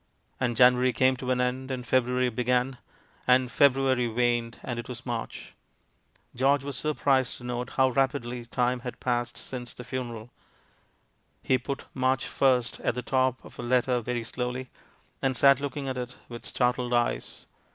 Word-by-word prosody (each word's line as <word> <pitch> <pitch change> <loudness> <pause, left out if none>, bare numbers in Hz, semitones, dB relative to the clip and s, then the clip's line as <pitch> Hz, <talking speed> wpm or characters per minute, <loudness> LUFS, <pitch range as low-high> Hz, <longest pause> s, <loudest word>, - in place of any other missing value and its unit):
And 120 -3 0
January 125 0 +5
came 130 0 +3
to 125 0 -5
an 125 -1 +2
end, 125 +1 -1
and 125 -2 -4
February 125 0 +2
began. 125 +2 0 0.5
And 125 0 +4
February 135 -3 +3
waned; 120 0 0
and 120 -1 -4
it 120 - -7
was 125 0 -7
March. 120 -2 -5 0.8
George 135 +2 +2
was 140 -1 -3
surprised 135 -3 +1
to - - -13
note 125 0 -4
how 130 -1 +5
rapidly 125 -2 -1
time 125 +1 0
had 125 0 -7
passed 120 -1 -1
since 125 -3 -7
the 125 - -8
funeral. 120 -2 -5 1.1
He 130 - +2
put 135 +3 -5
"March 130 0 +1
1st" 125 -3 +1
at - - +1
the 125 - -3
top 130 -1 0
of - - -14
a - - -2
letter 125 0 +2
veiy 120 0 -3
slowly, 125 +1 -4 0.5
and 130 -2 +1
sat 140 0 +6
looking 145 0 -4
at 130 -1 -3
it 125 0 -6
with 120 -1 -7
startled 125 -1 0
eyes. 120 0 -1
125 Hz, 165 wpm, -27 LUFS, 120-130 Hz, 1.1 s, sat